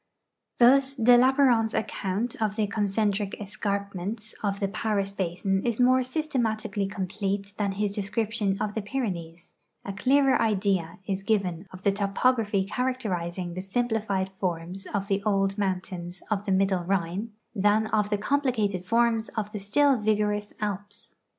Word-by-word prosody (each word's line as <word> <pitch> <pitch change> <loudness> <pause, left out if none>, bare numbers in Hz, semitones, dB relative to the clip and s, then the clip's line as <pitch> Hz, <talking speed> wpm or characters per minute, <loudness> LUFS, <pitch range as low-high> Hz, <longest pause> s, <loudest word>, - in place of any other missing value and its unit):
Thus 270 +3 +5
de 245 -1 +6
Lapparent's 250 -3 +4
account 215 +2 -2
of 210 -2 0
the 215 -1 +1
concentric 205 0 0
escarpments 200 0 -3
of 200 -1 -1
the 200 - 0
Paris 200 -1 -1
basin 190 +1 -1
is 235 -1 -1
more 255 +1 +5
systematically 230 -7 -1
complete 195 +1 -3
than 200 -2 0
his 205 +1 -1
description 205 0 -1
of 210 -1 -2
the 220 - -2
Pyrenees; 180 -8 -4 0.3
a 200 - -4
clearer 265 +5 +3
idea 195 -6 0
is 195 -1 -2
given 195 -4 -1
of 185 0 -11
the 200 - +4
topography 205 +1 +1
characterizing 185 -8 -2
the 185 - -4
simplified 205 -2 -1
forms 185 0 -4
of 200 -1 -2
the 200 -1 0
old 195 0 +1
mountains 185 -2 -2
of 205 -1 0
the 200 - -1
middle 190 -1 +2
Rhine 190 +4 -2 0.2
than 210 +1 +3
of 210 -1 +2
the 205 - +1
complicated 215 -6 0
forms 230 +2 +2
of 210 -1 -2
the 210 - -5
still 270 +8 +3
vigorous 210 -1 0
Alps. 205 -1 -4
205 Hz, 145 wpm, -27 LUFS, 195-225 Hz, 0.3 s, de